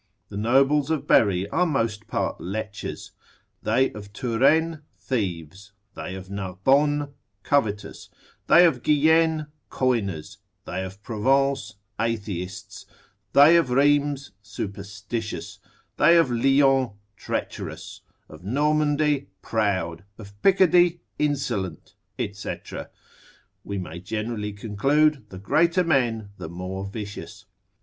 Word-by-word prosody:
The -, -, -9 dB
nobles 135 Hz, +6 st, +3 dB
of 160 Hz, -2 st, -1 dB
Berry 100 Hz, -3 st, +3 dB
are 180 Hz, +10 st, +1 dB
most 115 Hz, -7 st, -1 dB
part -, -, -2 dB
lechers, 105 Hz, +2 st, -5 dB, 0.5 s
they 130 Hz, +1 st, +2 dB
of 100 Hz, -1 st, -10 dB
Touraine 145 Hz, +8 st, +2 dB, 0.2 s
thieves, 95 Hz, -, -4 dB, 0.2 s
they 95 Hz, -, -6 dB
of 95 Hz, 0 st, -9 dB
Narbonne 135 Hz, +10 st, +1 dB, 0.3 s
covetous, 110 Hz, -8 st, -1 dB, 0.4 s
they 175 Hz, +2 st, +7 dB
of 135 Hz, -8 st, +2 dB
Guienne 160 Hz, +2 st, +3 dB, 0.2 s
coiners, 105 Hz, -11 st, -1 dB, 0.3 s
they 95 Hz, -, -3 dB
of 95 Hz, +2 st, -9 dB
Provence 135 Hz, +3 st, +1 dB, 0.2 s
atheists, 100 Hz, -5 st, -4 dB, 0.5 s
they 145 Hz, +4 st, +8 dB
of 165 Hz, -7 st, +2 dB
Rheims 145 Hz, 0 st, +2 dB
superstitious, 105 Hz, +2 st, -6 dB, 0.4 s
they 165 Hz, +3 st, +6 dB
of 165 Hz, -7 st, +3 dB
Lyons 135 Hz, 0 st, +3 dB, 0.2 s
treacherous, -, -, -5 dB, 0.3 s
of 80 Hz, +2 st, -13 dB
Normandy 150 Hz, +2 st, +1 dB, 0.2 s
proud, 95 Hz, -6 st, -1 dB
of 100 Hz, -2 st, -11 dB
Picardy 175 Hz, -2 st, +4 dB, 0.2 s
insolent, 125 Hz, -, -2 dB, 0.3 s
&c. 100 Hz, 0 st, -3 dB, 1.1 s
We 100 Hz, -, -5 dB
may 85 Hz, -2 st, -6 dB
generally 105 Hz, +2 st, -4 dB
conclude, 135 Hz, +5 st, +1 dB
the 95 Hz, -, -9 dB
greater 170 Hz, -, +2 dB
men, 120 Hz, -10 st, +1 dB
the 80 Hz, -, -6 dB
more 90 Hz, +3 st, -5 dB
vicious. 105 Hz, 0 st, -8 dB
115 Hz, 105 wpm, -24 LUFS, 100-145 Hz, 1.1 s, they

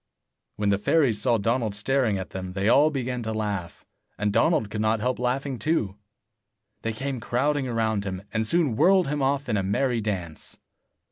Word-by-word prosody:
When 105 Hz, -1 st, 0 dB
the 100 Hz, -1 st, +2 dB
fairies 120 Hz, -3 st, +2 dB
saw 120 Hz, +1 st, +3 dB
Donald 115 Hz, 0 st, 0 dB
staring 115 Hz, -1 st, +1 dB
at 95 Hz, -, -6 dB
them, 95 Hz, -1 st, -6 dB
they 95 Hz, +2 st, -1 dB
all 145 Hz, +6 st, +5 dB
began 125 Hz, -4 st, -3 dB
to 110 Hz, -1 st, -3 dB
laugh, 105 Hz, -5 st, -4 dB, 0.3 s
and 105 Hz, -1 st, 0 dB
Donald 115 Hz, -2 st, +2 dB
could 105 Hz, -, -2 dB
not 110 Hz, +1 st, +1 dB
help 125 Hz, +3 st, -1 dB
laughing 130 Hz, +1 st, -1 dB
too. 110 Hz, -, 0 dB, 0.9 s
They 115 Hz, -, -2 dB
came 135 Hz, +3 st, -4 dB
crowding 135 Hz, +5 st, 0 dB
round 110 Hz, -3 st, 0 dB
him, 95 Hz, -1 st, -4 dB
and 110 Hz, 0 st, 0 dB
soon 160 Hz, -7 st, +2 dB
whirled 185 Hz, -, +4 dB
him 145 Hz, 0 st, -1 dB
off 140 Hz, +1 st, 0 dB
in 110 Hz, -3 st, 0 dB
a -, -, +1 dB
merry 115 Hz, +5 st, 0 dB
dance. 90 Hz, -7 st, -5 dB
115 Hz, 185 wpm, -25 LUFS, 105-135 Hz, 0.9 s, all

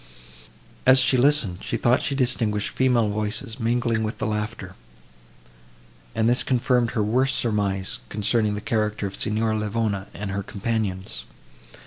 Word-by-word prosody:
As 130 Hz, 0 st, +7 dB
she 130 Hz, 0 st, +5 dB
listened, 125 Hz, -8 st, +3 dB
she -, -, -2 dB
thought 125 Hz, +2 st, +3 dB
she 140 Hz, -, -1 dB
distinguished 115 Hz, -5 st, 0 dB
female 125 Hz, -4 st, +2 dB
voices 110 Hz, +3 st, -3 dB
mingling 115 Hz, -1 st, +1 dB
with 110 Hz, 0 st, -3 dB
the -, -, -2 dB
laughter, 105 Hz, -3 st, -3 dB, 1.4 s
and 110 Hz, -, +2 dB
this 120 Hz, +1 st, +3 dB
confirmed 125 Hz, -2 st, +1 dB
her 105 Hz, -, +2 dB
worst 130 Hz, +5 st, +1 dB
surmise, 100 Hz, -4 st, -1 dB
concerning 105 Hz, 0 st, +1 dB
the 105 Hz, -, -5 dB
character 110 Hz, -6 st, -1 dB
of 95 Hz, -, -5 dB
Signora 110 Hz, +1 st, 0 dB
Livona 105 Hz, -2 st, -1 dB
and 100 Hz, -1 st, -5 dB
her 100 Hz, 0 st, -2 dB
companions. 95 Hz, -, -3 dB
110 Hz, 140 wpm, -24 LUFS, 105-120 Hz, 1.4 s, As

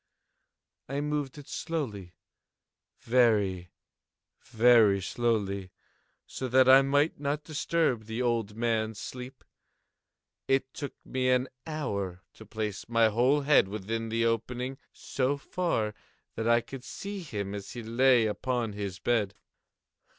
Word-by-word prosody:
I 140 Hz, +2 st, -2 dB
moved 150 Hz, -2 st, -2 dB
it 145 Hz, -, -11 dB
slowly—very, 105 Hz, -, -2 dB, 0.8 s
very 110 Hz, -4 st, +5 dB
slowly, 100 Hz, -3 st, -1 dB, 0.5 s
so 130 Hz, -, -5 dB
that 130 Hz, +1 st, +5 dB
I 135 Hz, +1 st, +9 dB
might 145 Hz, +3 st, +1 dB
not 145 Hz, +1 st, -2 dB
disturb 155 Hz, -6 st, 0 dB
the 110 Hz, +2 st, -5 dB
old 115 Hz, -4 st, 0 dB
man's 110 Hz, -2 st, -1 dB
sleep. 125 Hz, +4 st, -8 dB, 1.0 s
It 135 Hz, 0 st, +1 dB
took 145 Hz, -, -6 dB
me 130 Hz, 0 st, 0 dB
an 125 Hz, +1 st, +2 dB, 0.2 s
hour 100 Hz, -, -3 dB
to 110 Hz, -, -14 dB
place 105 Hz, 0 st, -4 dB
my 115 Hz, -1 st, +4 dB
whole 125 Hz, +7 st, +3 dB
head 140 Hz, -7 st, +4 dB
within 110 Hz, +3 st, -4 dB
the 115 Hz, +1 st, +1 dB
opening 125 Hz, +4 st, -2 dB
so 135 Hz, +2 st, -1 dB
far 140 Hz, -9 st, -1 dB, 0.4 s
that 115 Hz, -, -3 dB
I 120 Hz, 0 st, +5 dB
could 130 Hz, +1 st, -9 dB
see 200 Hz, +9 st, -6 dB
him 105 Hz, -, -5 dB
as 100 Hz, +2 st, -7 dB
he 120 Hz, -1 st, -6 dB
lay 120 Hz, +1 st, +4 dB
upon 115 Hz, +1 st, -1 dB
his 100 Hz, -3 st, -4 dB
bed. 105 Hz, -3 st, 0 dB
120 Hz, 125 wpm, -29 LUFS, 105-135 Hz, 1.0 s, I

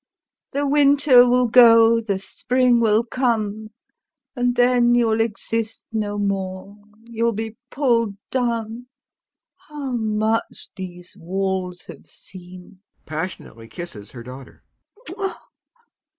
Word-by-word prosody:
The 285 Hz, +1 st, -1 dB
winter 280 Hz, -3 st, +5 dB
will 250 Hz, 0 st, +3 dB
go, 230 Hz, -1 st, +6 dB
the 205 Hz, -4 st, -2 dB
spring 250 Hz, +5 st, +1 dB
will 220 Hz, 0 st, +3 dB
come, 220 Hz, -4 st, -2 dB, 0.7 s
and 245 Hz, -1 st, 0 dB
then 245 Hz, -1 st, +3 dB
you'll 225 Hz, -2 st, +2 dB
exist 225 Hz, 0 st, -3 dB
no 210 Hz, -2 st, -2 dB
more, 195 Hz, -1 st, -3 dB, 0.3 s
you'll 230 Hz, 0 st, -1 dB
be 220 Hz, +1 st, -5 dB
pulled 230 Hz, -7 st, 0 dB, 0.2 s
down. 235 Hz, -1 st, -2 dB, 0.8 s
How 290 Hz, -3 st, -6 dB
much 220 Hz, -1 st, -2 dB
these 180 Hz, -1 st, -9 dB
walls 185 Hz, 0 st, -3 dB
have -, -, -13 dB
seen! 185 Hz, +1 st, -14 dB
225 Hz, 90 wpm, -21 LUFS, 205-245 Hz, 0.8 s, go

